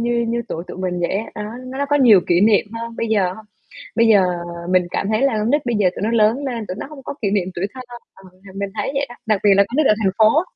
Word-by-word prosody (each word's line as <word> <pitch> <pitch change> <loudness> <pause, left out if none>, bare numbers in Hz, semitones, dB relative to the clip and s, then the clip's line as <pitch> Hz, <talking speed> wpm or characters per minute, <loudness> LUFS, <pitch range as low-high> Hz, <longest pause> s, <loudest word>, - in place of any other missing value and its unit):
như 235 0 0
như 235 0 -1
tuổi 165 +2 -5
tụi - - -8
mình 180 -1 -2
vậy 170 - -1
á, 215 - -2
đó, 210 - -5 0.2
nó 260 +1 -7
nó 285 - 0
có 290 +1 +2
nhiều 230 -9 +6
kỷ 175 0 +3
niệm 210 0 +4
hơn 230 0 -6
bây 230 - -2
giờ 200 -5 +1
hông? 220 +3 -12 0.5
Bây 230 0 +4
giờ 205 -4 +5 0.5
mình 185 -1 +3
cảm 195 - -2
thấy 215 +3 0
là 275 -4 +2
con 215 +2 0
nít 290 -1 +1
bây 240 -2 0
giờ 195 -3 +3
tụi - - -5
nó 220 - 0
lớn 230 +4 +2
lên, 235 -5 -4
tụi 185 - -3
nó - - -5
hông 285 -1 -12
có - - -6
kỷ 200 - +1
niệm 195 -3 0
tuổi 180 +3 -2
thơ. 260 - -8 0.3
Ờ, 190 - -18
mà 190 +1 -16
mình 200 0 -4
thấy 205 +3 -2
vậy 275 0 0
đó, 240 - -11
đặc 215 -3 +1
biệt 205 - +6
là 200 - +5
con 250 - -5
nít 305 -2 +3
ở 215 - +5
thành 190 -2 +2
phố. 225 +9 +5
220 Hz, 305 wpm, -20 LUFS, 195-240 Hz, 0.5 s, nhiều